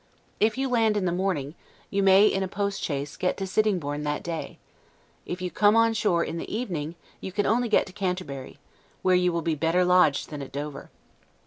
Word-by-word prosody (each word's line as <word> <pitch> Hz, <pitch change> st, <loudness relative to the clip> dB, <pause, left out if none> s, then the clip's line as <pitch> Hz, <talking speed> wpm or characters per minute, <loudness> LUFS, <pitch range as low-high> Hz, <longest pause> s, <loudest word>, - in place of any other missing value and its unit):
If 215 Hz, +3 st, +2 dB
you 270 Hz, 0 st, 0 dB
land 225 Hz, -4 st, +2 dB
in 195 Hz, -, 0 dB
the 175 Hz, -, +1 dB
morning, 175 Hz, -6 st, -1 dB, 0.4 s
you 200 Hz, -, +1 dB
may, 195 Hz, +1 st, +6 dB
in 195 Hz, -2 st, +2 dB
a 190 Hz, -, -1 dB
postchaise, 185 Hz, -8 st, -3 dB
get 180 Hz, -, 0 dB
to 195 Hz, -, -3 dB
Sittingborne 185 Hz, -8 st, 0 dB
that 150 Hz, 0 st, -2 dB
day; 165 Hz, -2 st, -5 dB, 0.7 s
if 180 Hz, +1 st, -5 dB
you 180 Hz, -, -3 dB
come 205 Hz, +5 st, +4 dB
on 230 Hz, 0 st, +4 dB
shore 185 Hz, -6 st, +1 dB
in 165 Hz, +1 st, -4 dB
the -, -, -7 dB
evening, 175 Hz, -9 st, -3 dB, 0.2 s
you 190 Hz, -, -6 dB
can 205 Hz, +2 st, 0 dB
only 240 Hz, +2 st, +1 dB
get 215 Hz, -, +3 dB
to 190 Hz, -, -12 dB
Canterbury, 180 Hz, -9 st, -4 dB, 0.5 s
where 185 Hz, -, +4 dB
you 180 Hz, 0 st, +3 dB
will 170 Hz, -1 st, -2 dB
be 165 Hz, -, 0 dB
better 165 Hz, +4 st, +2 dB
lodged 180 Hz, -5 st, +3 dB
than 150 Hz, -2 st, -5 dB
at 135 Hz, -, -8 dB
Dover. 145 Hz, 0 st, -6 dB
180 Hz, 205 wpm, -26 LUFS, 155-205 Hz, 0.7 s, may